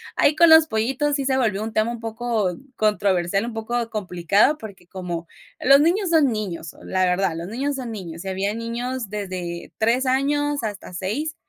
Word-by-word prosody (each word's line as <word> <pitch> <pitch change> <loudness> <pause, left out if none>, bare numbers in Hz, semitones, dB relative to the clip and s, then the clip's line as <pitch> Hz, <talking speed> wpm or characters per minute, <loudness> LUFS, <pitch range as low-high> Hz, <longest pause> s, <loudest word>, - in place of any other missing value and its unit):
Ahí, 295 - +3
con 340 +2 +6
los 320 0 +8
pollitos, 265 +5 0
sí 275 -2 -1
se 265 0 +2
volvió 215 -5 0
un 220 0 -5
tema 215 +2 +1
un 235 - -6
poco 225 -4 -1 0.2
controversial, 200 -2 +1
un 235 - -5
poco 230 +1 -2
complicado, 200 - +2
porque, 195 -5 -11
como 175 -3 -5 0.3
los 275 +2 +6
niños 355 +4 +2
son 305 -6 +4
niños, 185 -7 -4
la 185 0 +1
verdad, 180 -1 +1
los 165 +1 -5
niños 270 +7 -2
son 250 -3 -5
niños, 175 -5 -7
y - - -5
habían 195 +3 -1
niños 235 0 -4
desde 185 -4 -5
3 235 +4 +2
años 290 +2 +1
hasta 205 -4 -5
6, 235 - -3
220 Hz, 185 wpm, -23 LUFS, 190-265 Hz, 0.3 s, los